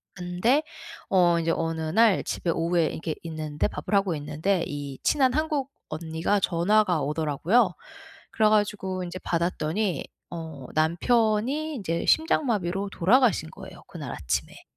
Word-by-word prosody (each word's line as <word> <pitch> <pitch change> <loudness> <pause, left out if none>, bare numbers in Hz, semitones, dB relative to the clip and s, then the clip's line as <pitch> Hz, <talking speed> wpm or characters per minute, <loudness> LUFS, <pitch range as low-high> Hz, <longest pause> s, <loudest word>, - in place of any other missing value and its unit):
근데 180 - +1 0.5
어 175 -3 +4
인제 165 0 0
어느 165 -1 -2
날 200 +6 +3
집에 175 - -3
오후에 165 0 +1
이렇게 160 -1 -4
있는데 155 -2 -2
밥을 150 +8 -6
하고 195 -4 +2
있는데 160 +5 -1
이 145 -2 -6
친한 265 -4 +3
한국 295 -2 -1 0.2
언니가 160 +5 -1
전화가 180 -1 +2
오더라고요. 160 - +1 0.6
그래 215 -1 +3
가지고 200 -3 0
인제 180 +1 -6
받았더니 170 +2 -1 0.3
어 160 -5 -7
남편이 225 - +1
인제 170 -8 -2
심장마비로 200 - +1
돌아가신 195 - +3
거예요, 190 -2 -12
그날 145 -8 -7
아침에. 70 -8 -3
180 Hz, 310 characters per minute, -26 LUFS, 160-215 Hz, 0.6 s, 어